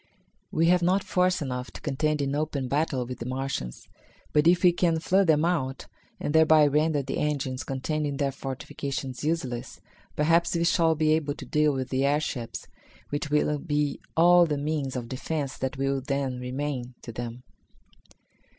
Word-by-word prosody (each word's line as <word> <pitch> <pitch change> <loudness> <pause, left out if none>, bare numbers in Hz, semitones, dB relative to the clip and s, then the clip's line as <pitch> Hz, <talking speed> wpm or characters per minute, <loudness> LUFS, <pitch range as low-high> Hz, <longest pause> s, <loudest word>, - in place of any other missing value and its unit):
We 165 - +2
have 180 +1 +4
not 185 +3 +2
force 180 -2 +1
enough 125 -1 -4
to - - -8
contend 150 +1 0
in 135 0 -1
open 145 -3 -2
battle 140 -2 0
with 125 +1 -7
the 120 - -5
Martians, 130 - -4 0.5
but 150 +2 +4
if 175 +2 +4
we 180 - +7
can 170 -1 +1
flood 190 +3 +2
them 155 0 +4
out, 135 -7 -1 0.3
and 145 - -2
thereby 160 -1 +6
render 150 0 +2
the - - -3
engines 140 -3 -1
contained 150 +3 -2
in 140 -1 -3
their 140 -1 0
fortifications 135 0 -5
useless, 140 -7 -3 0.4
perhaps 165 +3 +2
we 170 - +1
shall 165 -1 +3
be 155 0 +3
able 150 -2 0
to - - -9
deal 150 -1 +2
with 130 -2 -3
the 130 +1 0
airships, 140 -4 -1 0.4
which 145 +1 -3
will 150 0 +1
be 145 -3 -1 0.2
all 175 +1 +6
the 150 -2 -1
means 145 -2 -2
of 120 -2 -4
defence 135 +2 -3
that 130 +1 -3
will 135 0 0
then 135 -2 -2
remain 125 -1 -4
to 120 - -7
them." 120 +2 -6
145 Hz, 175 wpm, -27 LUFS, 130-160 Hz, 0.5 s, we